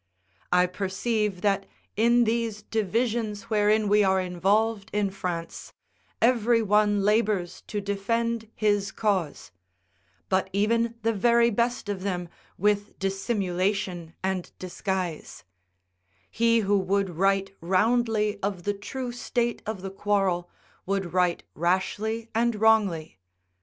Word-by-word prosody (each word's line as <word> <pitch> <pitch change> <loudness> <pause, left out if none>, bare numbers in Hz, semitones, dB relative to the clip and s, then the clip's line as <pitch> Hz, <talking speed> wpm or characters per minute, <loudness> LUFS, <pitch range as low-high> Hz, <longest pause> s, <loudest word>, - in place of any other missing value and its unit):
I 180 0 +5
perceive 195 +2 -2
that 200 -2 +1 0.3
in 235 +3 +4
these 225 -2 -1
divisions 225 +1 -1
wherein 210 0 +3
we 210 +1 +4
are 190 -1 +3
involved 200 +4 0
in 205 -2 +1
France, 175 -3 -5 0.5
every 235 -1 +3
one 205 -1 +3
labours 205 -4 +1
to 210 - -3
defend 225 +3 -1
his 205 -2 +1
cause; 190 - -1 0.8
but 190 0 +1
even 230 +3 +1
the 230 0 +2
very 235 +3 +4
best 235 +1 0
of 200 -2 -3
them 180 -3 -3 0.3
with 205 +1 0
dissimulation 190 -3 -2
and 190 -2 -2
disguise: 185 -2 -4 0.9
he 230 0 +3
who 200 0 +2
would 195 0 0
write 195 +3 +1
roundly 215 +3 +1
of 195 -3 -3
the 205 - 0
true 245 +5 -5
state 240 0 -2
of 205 -4 -4
the 195 - -5
quarrel, 195 -3 0 0.4
would 195 -3 -2
write 180 -2 +1
rashly 205 +6 -1
and 235 0 +1
wrongly. 205 - +2
205 Hz, 120 wpm, -26 LUFS, 190-225 Hz, 0.9 s, I